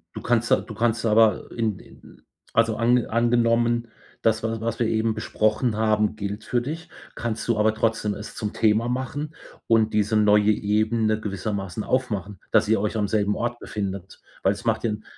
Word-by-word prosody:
Du -, -, -5 dB
kannst 120 Hz, -1 st, +1 dB
a -, -, +7 dB
du 110 Hz, -, -9 dB
kannst 115 Hz, +1 st, 0 dB
aber 110 Hz, -2 st, +3 dB
in 110 Hz, -4 st, -2 dB
in -, -, -17 dB, 0.3 s
also, 115 Hz, -1 st, +3 dB
an 120 Hz, +1 st, +3 dB
angenommen, 120 Hz, 0 st, +2 dB, 0.3 s
das 110 Hz, 0 st, +2 dB
was 115 Hz, -1 st, -3 dB
was 115 Hz, 0 st, -3 dB
wir 115 Hz, -, +2 dB
eben 110 Hz, 0 st, +1 dB
besprochen 110 Hz, +1 st, 0 dB
haben, 110 Hz, -1 st, +1 dB
gilt 100 Hz, 0 st, -5 dB
für 120 Hz, -, 0 dB
dich, 160 Hz, +6 st, -6 dB, 0.2 s
kannst 115 Hz, -1 st, -4 dB
du 115 Hz, -2 st, +1 dB
aber 110 Hz, +1 st, +3 dB
trotzdem 110 Hz, -2 st, 0 dB
es 105 Hz, -, -8 dB
zum 105 Hz, -2 st, -3 dB
Thema 110 Hz, +1 st, +2 dB
machen 145 Hz, +5 st, -3 dB, 0.3 s
und 110 Hz, -1 st, +3 dB
diese 105 Hz, +1 st, +1 dB
neue 105 Hz, 0 st, +5 dB
Ebene 110 Hz, +1 st, +1 dB
gewissermaßen 100 Hz, -1 st, -4 dB
aufmachen, 105 Hz, -7 st, -2 dB
dass -, -, +4 dB
ihr 110 Hz, -1 st, +3 dB
euch 105 Hz, +1 st, -1 dB
am 105 Hz, -1 st, 0 dB
selben 105 Hz, -1 st, +1 dB
Ort 120 Hz, 0 st, -3 dB
befindet. 95 Hz, -2 st, -5 dB, 0.2 s
Weil -, -, +3 dB
es -, -, -11 dB
macht -, -, +1 dB
den 110 Hz, -1 st, -2 dB
110 Hz, 180 wpm, -24 LUFS, 105-115 Hz, 0.3 s, a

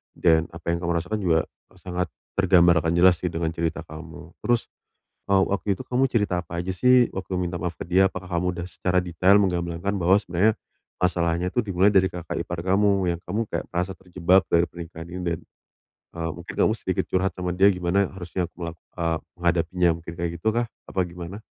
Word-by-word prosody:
Dan, 80 Hz, -2 st, +3 dB
apa 85 Hz, 0 st, -3 dB
yang 85 Hz, -, -1 dB
kamu 85 Hz, -, 0 dB
rasakan 105 Hz, +6 st, -3 dB
juga, 80 Hz, -3 st, +3 dB, 0.3 s
e -, -, -22 dB
sangat 90 Hz, 0 st, -3 dB, 0.3 s
tergambarkan 85 Hz, -3 st, +5 dB
jelas 90 Hz, 0 st, +5 dB
sih, 90 Hz, -, -1 dB
dengan 80 Hz, -1 st, -1 dB
cerita 85 Hz, -1 st, -2 dB
kamu. 85 Hz, +2 st, -10 dB
Terus, 120 Hz, -1 st, +1 dB, 0.6 s
eee, 95 Hz, -1 st, +5 dB
waktu 100 Hz, 0 st, -1 dB
itu -, -, -5 dB
kamu 125 Hz, +2 st, +1 dB
cerita 105 Hz, -6 st, +1 dB
apa 85 Hz, +1 st, -6 dB
aja 95 Hz, +2 st, -3 dB
sih, 125 Hz, +4 st, +5 dB
waktu 95 Hz, 0 st, -4 dB
minta 90 Hz, -1 st, -2 dB
maaf 85 Hz, -2 st, -3 dB
ke -, -, -5 dB
dia? 95 Hz, +1 st, +4 dB
Apakah 90 Hz, -1 st, -7 dB
kamu 90 Hz, 0 st, -1 dB
udah 85 Hz, -, -4 dB
secara 90 Hz, +2 st, 0 dB
detail 90 Hz, +3 st, +4 dB
menggamblangkan 90 Hz, 0 st, 0 dB
bahwa 95 Hz, +1 st, +4 dB
sebenarnya, 100 Hz, +2 st, +1 dB, 0.4 s
masalahnya 85 Hz, -1 st, +1 dB
itu 120 Hz, +5 st, 0 dB
dimulai 95 Hz, -1 st, +3 dB
dari 95 Hz, -1 st, +4 dB
kakak 85 Hz, -2 st, -5 dB
ipar 85 Hz, -1 st, -5 dB
kamu, 95 Hz, +1 st, +2 dB
yang -, -, -16 dB
kamu 110 Hz, +5 st, -2 dB
kayak -, -, -3 dB
merasa 90 Hz, +2 st, -1 dB
terjebak 90 Hz, +1 st, +2 dB
dari 85 Hz, 0 st, +4 dB
pernikahan 85 Hz, -1 st, -9 dB
ini. 90 Hz, +2 st, -6 dB
Dan, 85 Hz, -2 st, -1 dB, 0.8 s
eee, 85 Hz, 0 st, -2 dB
mungkin 85 Hz, +1 st, -9 dB
kamu -, -, +3 dB
sedikit -, -, -1 dB
curhat 95 Hz, +1 st, +1 dB
sama 90 Hz, -1 st, -2 dB
dia, 95 Hz, +3 st, +5 dB
gimana 90 Hz, +1 st, +1 dB
harusnya 90 Hz, -1 st, -3 dB
aku -, -, -48 dB
mela 85 Hz, -2 st, -5 dB, 0.2 s
eee, 85 Hz, -1 st, 0 dB, 0.2 s
menghadapinya. 85 Hz, +1 st, +2 dB
Mungkin 85 Hz, +1 st, -8 dB
kayak 85 Hz, -1 st, -2 dB
gitukah, 115 Hz, +4 st, +1 dB, 0.2 s
apa 95 Hz, -, -3 dB
gimana? 90 Hz, +3 st, -8 dB
90 Hz, 195 wpm, -24 LUFS, 85-95 Hz, 0.8 s, tergambarkan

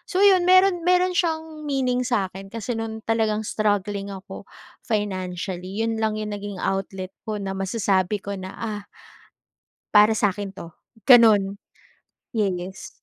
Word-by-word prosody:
So, 380 Hz, 0 st, +1 dB
'yon, 370 Hz, -3 st, +5 dB
meron 370 Hz, -1 st, +5 dB
meron 365 Hz, 0 st, +3 dB
siyang 320 Hz, -4 st, -2 dB
meaning 250 Hz, -3 st, 0 dB
sa'kin, 195 Hz, -5 st, -2 dB
kasi 230 Hz, +1 st, -3 dB
no'ng 220 Hz, 0 st, -5 dB
talagang, 220 Hz, -1 st, +1 dB
struggling 205 Hz, -1 st, -1 dB
ako, 190 Hz, -, -10 dB, 0.3 s
financially, 190 Hz, -2 st, -3 dB
'yon 225 Hz, -1 st, -1 dB
lang 220 Hz, -1 st, +1 dB
yung 215 Hz, 0 st, -4 dB
naging 205 Hz, -1 st, -5 dB
outlet 195 Hz, -1 st, -3 dB, 0.2 s
ko, 215 Hz, -, -1 dB
na 200 Hz, -2 st, -4 dB
masasabi 195 Hz, 0 st, 0 dB
ko 200 Hz, -, -5 dB
na, 190 Hz, 0 st, -8 dB
ah 210 Hz, -3 st, -5 dB, 1.1 s
"Para 210 Hz, +1 st, +6 dB
sa'kin 205 Hz, 0 st, 0 dB
'to". 170 Hz, -4 st, -10 dB, 0.3 s
gano'n 215 Hz, -6 st, +6 dB, 0.8 s
yes. 190 Hz, -3 st, -2 dB
210 Hz, 135 wpm, -23 LUFS, 195-240 Hz, 1.1 s, Para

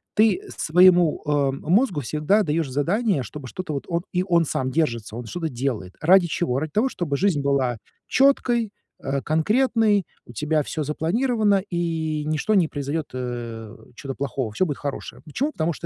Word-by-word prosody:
ты 220 Hz, -, +4 dB, 0.2 s
своему, 175 Hz, 0 st, +5 dB
а, 145 Hz, -2 st, +2 dB
мозгу 175 Hz, -, +1 dB
всегда 155 Hz, -, +1 dB
даешь 160 Hz, -3 st, -1 dB
задание, 170 Hz, -, +1 dB
чтобы 130 Hz, +4 st, -8 dB
что-то 175 Hz, +4 st, -5 dB
вот 140 Hz, -, -4 dB
он 170 Hz, -1 st, -1 dB
и 180 Hz, 0 st, +1 dB
он 170 Hz, -2 st, +3 dB
сам 130 Hz, -2 st, -2 dB
держится, 115 Hz, -8 st, -1 dB
он 120 Hz, 0 st, -6 dB
что-то 165 Hz, +7 st, -4 dB
делает. 120 Hz, -8 st, -3 dB
Ради 180 Hz, +2 st, +5 dB
чего? 155 Hz, -6 st, -1 dB
Ради 155 Hz, +1 st, -4 dB
того, 225 Hz, -, +2 dB
чтобы 165 Hz, -, -2 dB
жизнь 180 Hz, -5 st, +1 dB
была 135 Hz, -4 st, +1 dB, 0.3 s
четкой, 245 Hz, -5 st, +2 dB, 0.3 s
э, 135 Hz, 0 st, -1 dB
конкретной, 210 Hz, -, +2 dB, 0.2 s
у 120 Hz, -, -13 dB
тебя 150 Hz, +6 st, 0 dB
всё 155 Hz, +2 st, -3 dB
запланировано, 205 Hz, -, +1 dB, 0.2 s
и 160 Hz, -3 st, -1 dB
ничто 155 Hz, +7 st, 0 dB
не 185 Hz, -6 st, +4 dB
произойдет, 145 Hz, +1 st, -3 dB
э, 120 Hz, -3 st, -5 dB, 0.2 s
чё-то 135 Hz, 0 st, -6 dB
плохого, 135 Hz, -4 st, -3 dB
всё 150 Hz, -, +1 dB
будет 145 Hz, -, -3 dB
хорошее. 140 Hz, -1 st, -6 dB
Почему? 245 Hz, -, -2 dB
Потому 165 Hz, +1 st, -1 dB
что -, -, -13 dB
155 Hz, 170 wpm, -23 LUFS, 140-185 Hz, 0.3 s, своему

